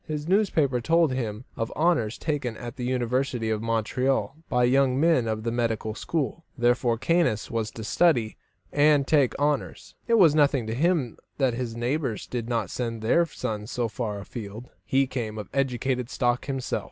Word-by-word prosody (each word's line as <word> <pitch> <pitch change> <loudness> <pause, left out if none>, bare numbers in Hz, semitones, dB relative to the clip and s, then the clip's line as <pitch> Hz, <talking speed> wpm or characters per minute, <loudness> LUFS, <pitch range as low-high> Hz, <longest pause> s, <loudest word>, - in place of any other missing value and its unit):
His 150 0 -4
newspaper 160 - +2
told 165 +1 +3
him 115 -2 -3
of 115 0 -3
honours 150 -10 +1
taken 140 -7 -2
at 120 -2 -7
the 125 - -4
University 125 -2 0
of 110 -1 -1
Montreal 125 +5 0
by 125 -1 +2
young 130 +1 +3
men 160 -7 +3
of 110 0 -2
the 115 - -1
medical 115 -2 -1
school; 160 +7 -3
therefore, 120 -1 +2
Caius 165 -7 +1
was 115 -2 -1
to 110 0 -8
study 120 -4 +2 0.4
and 145 -1 +4
take 140 -4 +2
honours. 145 0 -1
It 235 - +4
was 170 -8 +6
nothing 145 -5 +3
to 110 - -3
him 150 -3 0 0.2
that 130 -4 +2
his 120 -1 -4
neighbours 125 0 -2
did 120 -2 -4
not 115 -6 -1
send 115 -3 -3
their 170 +10 +3
sons 105 -7 -5
so 120 -3 -1
far 110 -2 -4
afield; 110 +2 -8
he 135 +6 +2
came 115 -4 -4
of 105 -3 -6
educated 130 -2 -1
stock 120 -2 0
himself. 135 -2 -2
125 Hz, 175 wpm, -26 LUFS, 115-145 Hz, 0.4 s, was